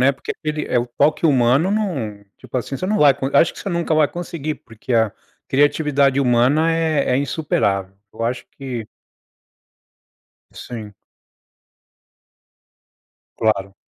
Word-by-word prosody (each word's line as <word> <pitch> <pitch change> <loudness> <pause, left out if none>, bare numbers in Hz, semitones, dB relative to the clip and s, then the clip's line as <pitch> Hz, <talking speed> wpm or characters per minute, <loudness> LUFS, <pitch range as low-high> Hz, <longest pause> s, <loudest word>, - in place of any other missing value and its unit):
né, 140 +2 +5
porque 130 - -8
aquele 150 0 -4
é 125 - +1
o 120 - -1
toque 145 +7 +1
humano 135 +5 +3
não, 135 - -2
tipo - - -7
assim, 125 +3 -3
você 185 - -3
não 210 +2 +1
vai 145 -2 +6
con 135 +1 -3
acho 165 - +5
que - - -13
você - - -5
nunca 170 -2 0
vai 155 -2 +4
conseguir, 165 -3 -4
porque 115 +2 -6
a 110 -3 +3 0.4
criatividade 145 -1 +2
humana 135 +6 +3
é 160 -3 +1
é - - +3
insuperável. 100 - -1 0.2
Eu 115 +1 -4
acho 120 +1 -3
que 125 -5 -6 1.7
Sim. 110 -4 -8 2.4
Claro. 100 -3 0
135 Hz, 140 wpm, -20 LUFS, 120-155 Hz, 2.4 s, vai